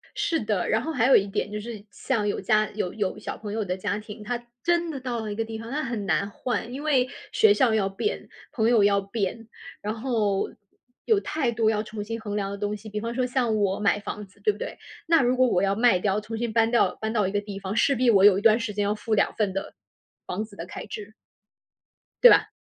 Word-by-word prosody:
是 325 - 0
的， 210 -4 -1
然 220 - +2
后 320 - -3
还 250 -6 +2
有 270 - +7
一 200 - +4
点 205 +1 -3
就 210 - -3
是 215 -1 -7
像 210 -2 -1
有 205 - -1
家 215 +2 +2
有 200 -4 -3
有 205 -4 -2
小 - - -6
朋 205 -1 -6
友 220 0 -1
的 180 -1 -2
家 190 - -2
庭， 210 0 -10
他 240 +2 -3 0.2
真 345 0 +1
的 290 -4 -4
到 250 -2 -3
了 215 -1 -4
一 - - -4
个 225 - -1
地 225 0 -6
方， 225 +1 -8
那 295 +3 -1
很 235 -5 -3
难 200 +1 +1
换， 235 +2 -3
因 280 +3 -6
为 270 -5 +3 0.2
学 440 -2 +5
校 260 - +3
要 210 -3 +2
变、 195 - -3 0.2
朋 225 -1 +1
友 230 -4 +5
要 200 0 +4
变， 205 +2 -3 0.3
然 210 +1 -2
后 220 -4 0 0.6
有 440 -3 +4
太 300 -10 -1
多 225 -1 +2
要 215 -1 0
重 215 -1 -6
新 225 +2 -5
衡 205 -2 -5
量 200 -1 -2
的 200 - -5
东 205 +1 -2
西， 215 +1 -10
比 210 0 -3
方 230 +2 -4
说 255 +1 0
像 245 -3 0
我 200 -2 +1
买 205 0 +2
房 210 0 -6
子， 200 +1 -25
对 210 - +4
不 205 - -11
对？ - - -5 0.3
那 330 -2 +5
如 250 0 +2
果 255 0 +5
我 185 -6 +2
要 195 0 +1
卖 230 -4 +4
掉， 195 +2 +1
重 215 +2 -6
新 235 0 -2
搬 225 0 +3
到 240 - +3
搬 220 0 -3
到 210 -4 +2
一 - - -3
个 205 0 0
地 200 -1 -7
方， 195 +1 -4
势 275 +4 +3
必 250 0 +3
我 200 -3 +6
有 200 -2 +7
一 - - -2
段 225 +1 +5
时 225 -2 -3
间 205 0 0
要 205 +1 0
付 220 +1 -3
2 205 - +2
份 205 -3 0
的 195 +1 -4 0.5
房 195 +4 -3
子 215 -2 -12
的 165 - -6
开 180 - -8
支。 210 0 -8 1.1
对 - - +12
吧？ - - +5
215 Hz, 275 characters per minute, -25 LUFS, 205-235 Hz, 1.1 s, 对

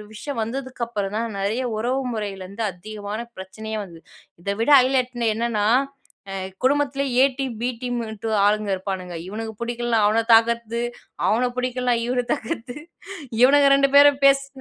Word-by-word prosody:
விஷயம் 270 +2 -5
வந்ததுக்கப்புறம் 235 -4 -4
தான், 230 +1 -1
நிறைய 215 +6 -1 0.2
உறவு 250 +4 0
முறையில 200 -3 -4
இருந்து 200 +4 -6
அதிகமான 210 +3 -7 0.2
பிரச்சனயே 220 +4 -7
வந்தது. 170 -4 -12 0.4
இத 200 - -2
விட 235 - +1
ஹைலட்ன 250 -2 0
என்னன்னா, 225 -2 0 0.6
அ - - -5 0.3
குடும்பத்திலயே 275 -2 +2
எ - - +7
டீம், 260 -4 -3
பி 245 - +1
டீம்ட்டு 225 -3 -4 0.2
ஆளுங்க 210 0 +1
இருப்பானுங்க. 185 -2 -5
இவனுக்கு 220 +2 -5
பிடிக்கலனா 240 -1 -1
அவன 225 +2 +2
தாக்குறது. 235 0 +2 0.5
அவன 245 +3 +2
பிடிக்கலனா 250 -1 0
இவன 245 0 0
தாக்குறது. 235 +3 -4 0.7
இவனுங்க 280 +2 +6
2 275 0 +3
பேரும் 285 -1 +7
பேசி 275 0 +4
235 Hz, 140 wpm, -23 LUFS, 215-255 Hz, 0.7 s, எ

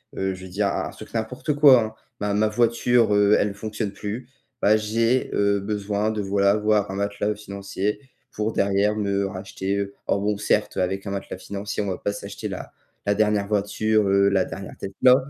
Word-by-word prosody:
heu, 95 0 -1
je 95 0 -10
veux - - -10
dire 100 +3 0
un 100 - -1
un - - -6
truc - - -12
n'importe 115 +6 -2
quoi, 140 -4 +7
hein. 110 0 -5 0.3
Ma 105 0 0
ma 105 +1 +3
voiture, 115 0 +3
heu, 105 0 +5
elle 100 -1 +1
fonctionne 105 0 -4
plus, 105 +5 -6 0.3
bah 105 +1 +5
j'ai, 115 +4 +1
heu, 100 0 +2
besoin, 105 +1 -1
de 110 -1 -2
voilà, 100 0 +2
voir 105 -1 +2
un 95 - -4
matelas, 100 +1 -1
heu, - - -3
financier 100 0 -3 0.3
pour 110 +1 -2
derrière 100 +1 +2
me 100 -2 0
racheter, 95 0 -4
heu 100 0 -2
en 100 - +2
Bon, 105 +1 0
certes, - - 0
avec 95 +2 -1
un 100 - -4
matelas 100 -1 -5
financier, 100 +2 -4
on - - -4
va 95 -2 -2
pas 100 - -2
s'acheter - - -6
la - - -6 0.3
la 100 - +3
dernière 105 -1 +1
voiture, 105 +1 +1
heu, 100 0 +4
la 95 -2 +2
dernière 95 -1 -8
Tesla, 125 +6 +4
100 Hz, 205 wpm, -24 LUFS, 100-110 Hz, 0.3 s, quoi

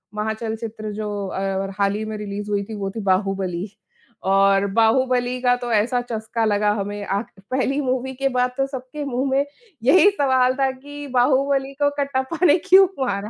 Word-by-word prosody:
महाचल्चित्र 220 0 -4
जो 205 -1 -4
अ, 190 - -4
और 195 0 -2
हाल 200 0 +2
ही 215 +1 -3
में 215 0 -5
रिलीज़ 205 0 -5
हुई 200 -1 0
थी 220 +2 -8
वो 200 -1 -3
थी - - -3
बाहुबली। 190 -1 -1 0.6
और 195 0 +4
बाहुबली 250 +2 +2
का 245 -1 +3
तो 245 -1 -5
ऐसा 230 +4 +2
चस्का 225 +1 -2
लगा 210 -1 +2
हमें 205 0 -4
आख़िर 200 -1 -4
पहली 265 +2 0
मूवी 260 0 -2
के 275 +1 0
बाद 250 -1 +1
तो 270 - +2
सबके 270 +2 -6
मुँह 265 0 -1
में 275 +1 +2 0.4
यही 370 +10 +6
सवाल 260 -7 +2
था 270 -1 +3
कि 290 +2 -9
बाहुबली 270 +2 +2
को 285 - +5
कट्टाप्पा 280 +5 -1
ने 300 +2 +6
क्यों 385 +1 +8 0.2
मारा? 200 -2 -3
240 Hz, 180 wpm, -22 LUFS, 205-265 Hz, 0.6 s, क्यों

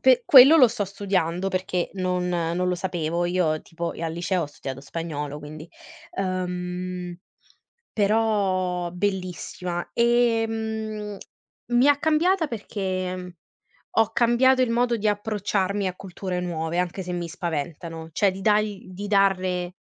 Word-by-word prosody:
pe 255 -1 +5
quello 275 +4 +9
lo 260 -6 +7
sto 225 -2 -2
studiando, 190 -2 -1
perché 185 -2 -2
non 180 -1 -1
non 175 +1 0
lo 180 - +1
sapevo. 175 -2 -2
Io 175 -3 +1
tipo 170 0 -5
e - - -8
al 165 -1 -2
liceo 175 +2 -1
ho - - -3
studiato 135 -2 -7
spagnolo 150 -1 -5
quindi... 155 +2 -10 0.5
uhm, 180 -1 -3 0.8
però 195 -5 +1
bellissima. 180 -2 -3
Ehm, 225 -3 0 0.5
mi 240 +3 +5
ha 290 -1 +5
cambiata 320 +3 +2
perché, 190 -5 -3
mhmm, 180 0 -7 0.7
ho 225 0 +3
cambiato 250 +3 +4
il 250 - +2
modo 240 +1 +2
di 215 -1 -1
approcciarmi 205 -1 0
a 180 - -4
culture 185 -1 -5
nuove 170 -1 -3
anche 180 +1 -1
se 180 - -5
mi 175 -1 -3
spaventano; 165 -1 -5
cioè 200 +3 +3
di 190 +1 -8
dargl 210 -1 +1
di 205 +3 -6
darle 185 -3 +1
185 Hz, 140 wpm, -24 LUFS, 175-215 Hz, 0.8 s, quello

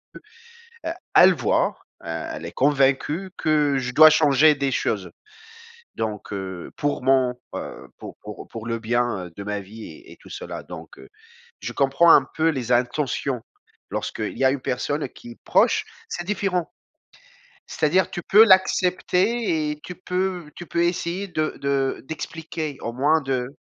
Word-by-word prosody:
heu, - - -9 0.7
e 325 - -1 0.2
elle 185 0 +8
voit, - - +1 0.3
heu, - - -8
elle 80 - -5
est - - -7
convaincue 145 +6 +1
que 150 -3 +2
je 125 -1 -3
dois 155 +2 +9
changer 150 0 +5
des 140 -1 -1
choses 100 -5 -1 0.9
donc, 105 -2 -4
heu, 95 -3 -6
pour 145 -3 -1
mon, 130 -2 +3 0.2
heu, - - -7
pour - - -9
pour 105 0 -9
pour 115 -1 -8
le 115 0 -2
bien, 120 -4 -1
heu, 85 - -13
de 100 - -7
ma 105 0 -3
vie 110 +3 -11
et 350 +3 -13
et - - -14
tout - - -17
cela - - -7
donc, - - -10
heu, - - -13 0.5
je - - -5
comprends 140 +5 +4
un 135 - +6
peu 160 0 +3
les 125 -5 -2
intentions. 125 0 0 0.5
Lorsqu'il - - -4
y 135 - +1
a 130 - +6
une 135 0 -2
personne 145 +3 -2
qui 120 - -12
est - - -17
proche, - - +3 0.2
c'est 175 - -4
différent. 195 -4 -1 1.0
C'est-à-dire 175 +5 +1
tu 175 - -4
peux 215 +3 +7
l'accepter 185 -1 +2
et 150 - -7
tu 180 - -7
peux 180 -3 -3
tu 175 - -8
peux 170 0 0
essayer 175 +2 -1
de 155 -3 -2
de 140 -1 0
d'expliquer 160 -2 -5
au 115 - -4
moins 150 +5 +2
de 130 -2 -2
145 Hz, 170 wpm, -23 LUFS, 125-170 Hz, 1.0 s, dois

